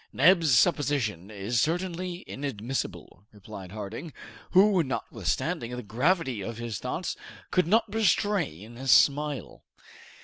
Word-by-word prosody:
"Neb's 165 -4 +5
supposition 125 - +1
is 110 +3 -1
certainly 175 +2 -2
inadmissible," 120 -6 -5
replied 100 -3 -10
Harding, 110 +9 -7 0.4
who, 190 0 +6
notwithstanding 125 -3 -2
the 125 - -6
gravity 130 - 0
of 115 +3 -5
his 115 -4 -4
thoughts, - - -3 0.4
could 180 -3 +2
not 220 +5 +4
restrain 180 - 0
a 135 - -6
smile. 145 +2 +3
135 Hz, 110 wpm, -27 LUFS, 110-175 Hz, 0.4 s, who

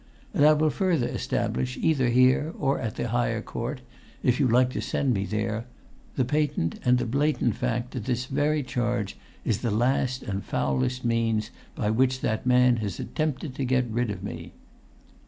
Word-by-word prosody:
And 145 - +5
I 155 - +7
will 155 0 +2
further 170 -10 +1
establish, 65 0 -2
either 135 -6 +2
here 130 +5 +3
or 140 -1 +1
at 115 -3 -3
the 120 - -2
higher 115 -1 0
court, 125 +3 -4 0.4
if 125 +1 +2
you 140 - +4
like 125 +2 +4
to - - -3
send 135 -3 0
me 100 -2 -1
there, 110 +3 -2 0.5
the 130 - +1
patent 145 - 0
and 125 0 +4
the 125 - -1
blatant 140 -1 +1
fact 125 0 -2
that 120 -5 -5
this 125 -1 -1
very 145 +2 0
charge 120 -4 -2 0.3
is 110 -2 +1
the 120 - 0
last 125 +3 +1
and 100 -5 -3
the - - -15
foulest 70 - -1
means 115 -1 +1 0.2
by 105 -2 0
which 130 +2 +2
that 110 +2 -1
man 125 -1 +5
has 105 -5 -4
attempted 155 -2 -2
to 135 - -3
get 125 0 +2
rid 120 +1 0
of 100 -2 -5
me!" 100 - -7
125 Hz, 185 wpm, -26 LUFS, 115-130 Hz, 0.5 s, I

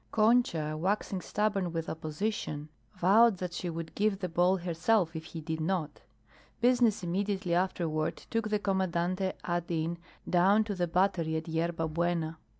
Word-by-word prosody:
Concha, 215 -9 +2
waxing 190 +3 -1
stubborn 200 -4 0
with 165 -1 -3
opposition, 155 -1 -3 0.3
vowed 200 +4 +5
that 180 -1 -4
she 175 - -3
would 165 -1 -5
give 210 -1 +1
the 185 -1 -3
ball 180 +3 +3
herself 175 +1 +1
if 160 0 -5
he 160 0 -7
did 160 +1 -3
not. 165 -2 -2 0.6
Business 240 -4 +3
immediately 190 +1 -1
afterward 170 -3 0
took 225 -1 0
the 210 - +2
Commandante 190 -1 0
ad. 175 -1 -2
in. 170 0 -1 0.3
down 195 +5 +4
to 210 -1 -3
the 180 -2 -1
Battery 170 -2 +1
at 160 - -5
Yerba 165 0 -1
Buena. 165 0 -1
175 Hz, 150 wpm, -30 LUFS, 165-200 Hz, 0.6 s, vowed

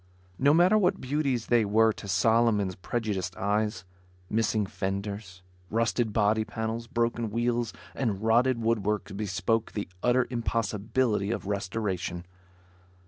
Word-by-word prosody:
No 140 +2 +5
matter 180 +7 +5
what 190 -1 +2
beauties 135 -3 -1
they 120 -2 +3
were 110 +2 +3
to 100 - -10
Solomon's 105 0 +2
prejudiced 95 -2 -3
eyes; 105 -2 -1 0.5
missing 110 -1 +1
fenders, 95 -1 -5 0.3
rusted 115 0 +1
body 110 0 +2
panels, 110 +1 -4
broken 115 -1 -1
wheels 120 +1 0 0.2
and 110 -8 -1
rotted 120 +2 +3
woodwork 105 -3 -1
bespoke 105 +2 -1
the 105 - -3
utter 125 +1 +3
impossibility 115 -2 0
of 115 - -3
restoration. 95 -3 -3
110 Hz, 120 wpm, -28 LUFS, 100-120 Hz, 0.5 s, No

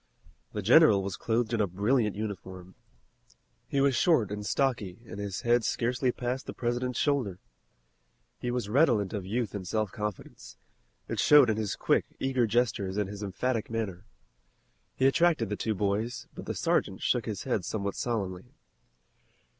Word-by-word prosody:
The - - -3
general 100 -2 +6
was 95 -1 -3
clothed 115 0 -1
in 115 - +2
a 105 - +2
brilliant 105 +4 +1
uniform. 95 -3 -6 0.9
He 140 - -1
was 140 -2 +3
short 120 - +3
and 105 0 -4
stocky 105 -4 -1
and 110 - -8
his 100 0 -4
head 120 -1 +3
scarcely 125 +3 0
passed 125 +2 -4
the - - -6
President's 120 +1 -2
shoulder. 130 -11 0 1.0
He 125 - -3
was 120 -3 -2
redolent 115 - +3
of 100 -3 -4
youth 115 0 -2
and 95 -3 -5
self 110 -1 -1
confidence. 95 - -6 0.5
It - - -3
showed 145 -6 +7
in 110 - -2
his 110 -3 -2
quick, - - +2
eager 130 -3 +1
gestures 105 -4 0
and 105 -2 0
his 100 +1 -8
emphatic 110 +4 -2
manner. 105 -5 -3 0.9
He 130 - +1
attracted 135 - +3
the 105 - -1
two 110 +1 -2
boys, 105 +4 -1
but - - -9
the - - -3
sergeant - - 0
shook - - +1
his - - -4
head - - -1
somewhat 100 -2 -3
solemnly. 105 0 -3
110 Hz, 160 wpm, -29 LUFS, 100-125 Hz, 1.0 s, showed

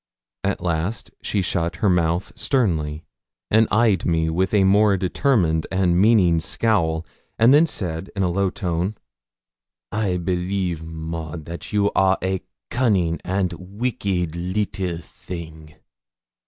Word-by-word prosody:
At - - -1
last 85 +5 -2
she 100 - 0
shut 85 -2 -1
her 105 - 0
mouth 85 0 +1
sternly, 80 - 0 0.5
and 110 0 +5
eyes 105 -5 +3
me 80 -1 +1
with 95 +4 0
a 105 -2 +4
more 100 +1 +4
determined 90 - +1
and 95 -2 +2
meaning 100 -6 +5
scowl, 80 -2 0 0.3
and 115 +4 +6
then 155 +3 +6
said 90 - -4
in 95 - 0
a 90 - +1
low 95 +2 +1
tone 90 +3 -2 1.0
'I 105 -4 0
believe, 90 -1 -2
Maud, 80 -1 -6
that 85 +1 -7
you 105 -1 +2
are 95 0 +3
a 95 0 -1 0.3
cunning 95 -10 +1
and 95 -1 -1
wicked 95 -4 -2
little 90 0 -2
thing.' 80 -2 -9
90 Hz, 130 wpm, -22 LUFS, 85-100 Hz, 1.0 s, and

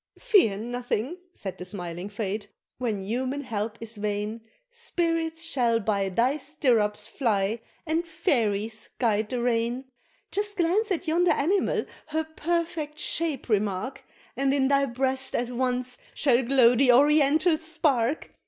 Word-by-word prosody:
"Fear 385 - +4
nothing," 245 - -3 0.2
said 190 -2 -6
the - - -5
smiling 180 0 -6
Fate, 205 0 -4 0.3
"when 220 -6 -2
human 255 +7 -2
help 225 -4 -3
is 230 -1 -7
vain, 210 +2 -2 0.3
Spirits 330 -8 -1
shall 240 -7 +2
by 200 -2 0
thy 245 +9 +2
stirrups 230 -8 0
fly, 220 -4 0 0.3
and 325 +1 0
fairies 230 - -1
guide 215 -3 +1
the 250 - -2
rein; 240 +2 0 0.5
Just 410 0 -1
glance 385 +5 +2
at 370 -1 -1
yonder 345 +3 +3
animal, 375 +8 +1 0.2
her 315 +1 -1
perfect 315 -1 -2
shape 310 -3 -1
remark, 210 +4 -1 0.3
And 270 0 +1
in 265 -1 +2
thy 275 0 +4
breast 265 +1 -1
at 245 +1 -1
once 250 0 -1 0.2
shall 260 -3 +3
glow 250 -1 +5
the 250 +1 +5
oriental 300 +4 +4
spark! 300 -5 0
255 Hz, 135 wpm, -26 LUFS, 220-310 Hz, 0.5 s, glow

